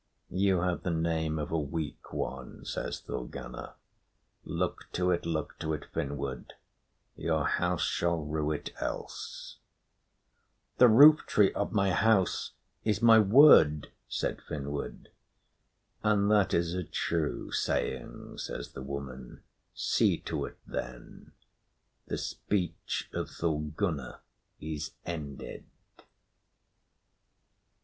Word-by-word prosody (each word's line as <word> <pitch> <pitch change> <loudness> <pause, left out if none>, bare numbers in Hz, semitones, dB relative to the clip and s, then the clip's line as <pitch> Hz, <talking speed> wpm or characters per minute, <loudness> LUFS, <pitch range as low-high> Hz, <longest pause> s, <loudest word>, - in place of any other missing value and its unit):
"You 95 -1 +2
have 90 -1 0
the - - -2
name 80 -1 0
of 75 - -3
a 80 - +1
weak 75 +1 -5
one," 65 -1 -5
says - - -4
Thorgunna. - - -7 0.7
"Look - - -3
to 90 0 +2
it, 85 -1 0
look 80 -2 -3
to 80 0 -2
it, 75 - -4
Finnward. 70 -3 -4 0.6
Your 80 -2 0
house 90 +2 +1
shall 85 -3 0
rue 75 0 -1
it 75 - -4
else." - - -5 1.2
"The 125 - +9
rooftree 120 -4 +7
of 100 - -1
my 100 -2 +2
house 100 -2 +2 0.3
is 110 +1 0
my 115 -1 +8
word," 100 - +7 0.2
said - - -2
Finnward. 70 0 -5 0.9
"And 105 -1 +3
that 105 -3 +4
is 85 0 +1
a 90 0 -2
true 80 -1 -2
saying," - - -2
says - - -5
the 65 - -8
woman. 65 -2 -7 0.3
"See - - +2
to - - -3
it, - - -10
then. 60 -1 -7 0.8
The - - -2
speech 95 -4 -2
of - - -3
Thorgunna 75 -2 -2 0.4
is 75 -1 -5
ended." 75 -5 -6
80 Hz, 110 wpm, -30 LUFS, 75-95 Hz, 1.2 s, The